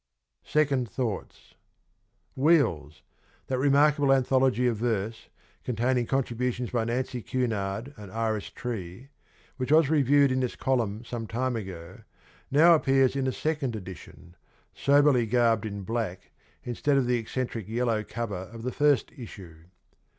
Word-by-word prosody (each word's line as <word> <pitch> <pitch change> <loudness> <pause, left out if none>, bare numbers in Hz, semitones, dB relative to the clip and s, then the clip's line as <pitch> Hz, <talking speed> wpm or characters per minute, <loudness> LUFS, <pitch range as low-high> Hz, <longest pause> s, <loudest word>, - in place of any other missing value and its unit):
SECOND 140 -6 +1
THOUGHTS. 115 -6 -5 0.4
' - - -45
Wheels,' 85 - +2 0.4
that 130 -1 -2
remarkable 145 +1 +4
anthology 130 -1 +3
of 120 -3 +1
verse, 110 -1 -2 0.3
containing 125 +1 0
contributions 125 -2 -1
by 120 -2 0
Nancy 125 +1 -2
Cunard 115 0 -2
and 105 -3 -10
Iris 110 -1 -2
Tree, 115 +1 -6 0.5
which 130 +1 -3
was 155 -1 +5
reviewed 140 -2 +4
in 130 - +1
this 125 -2 -2
column 115 -4 -1
some 115 -1 -5
time 125 +2 -1
ago, 90 -5 -7 0.5
now 160 +5 +6
appears 135 -4 +3
in 135 -1 0
a - - +1
second 150 -5 -2
edition, 90 -2 -10 0.4
soberly 140 -4 +3
garbed 115 -2 +2
in 100 -1 -6
black 110 -4 -4 0.3
instead 140 +4 0
of 135 - +2
the 125 0 +1
eccentric 115 -2 -4
yellow 115 -1 0
cover 100 -6 -5
of 115 -1 -9
the 125 - -2
first 145 -4 +2
issue. 90 -9 -11
120 Hz, 135 wpm, -27 LUFS, 110-135 Hz, 0.5 s, now